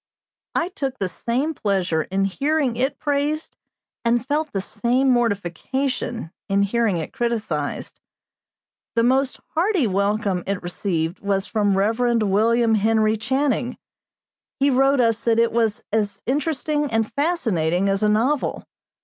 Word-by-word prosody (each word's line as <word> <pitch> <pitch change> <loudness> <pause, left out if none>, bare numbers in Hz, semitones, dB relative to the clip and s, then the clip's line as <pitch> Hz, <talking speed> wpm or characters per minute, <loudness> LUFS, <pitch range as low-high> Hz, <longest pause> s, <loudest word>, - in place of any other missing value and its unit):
I 340 - +1
took 275 -9 -4
the 195 - -1
same 255 - -2
pleasure 190 - 0
in 195 +4 -1
hearing 275 +5 0
it 265 +4 -1
praised 295 +1 -1 0.5
and 235 +1 +1
felt 300 +2 -1
the 195 - -1
same 240 +7 +1
mortification 235 0 -1 0.2
in 200 +1 +3
hearing 215 -2 +1
it 160 - -5
criticised. 215 -12 -2 1.0
The 230 - +3
most 260 +2 +2
hearty 350 - +1
welcome 200 -2 0
it 200 -1 -1
received 175 -1 -2
was 200 -1 0
from 205 -3 +1
Rev. 230 +4 +2
William 225 +3 +3
Henry 220 0 +3
Channing. 250 +2 -1 0.8
He 280 +1 +3
wrote 270 +1 +4
us 230 -1 +2
that 230 -1 +2
it 230 0 +3
was 225 -2 0
as 205 -2 -1
interesting 295 +2 0
and 225 -1 0
fascinating 200 - +1
as 195 +1 +1
a 210 - +3
novel. 250 +7 +1
230 Hz, 135 wpm, -22 LUFS, 200-270 Hz, 1.0 s, wrote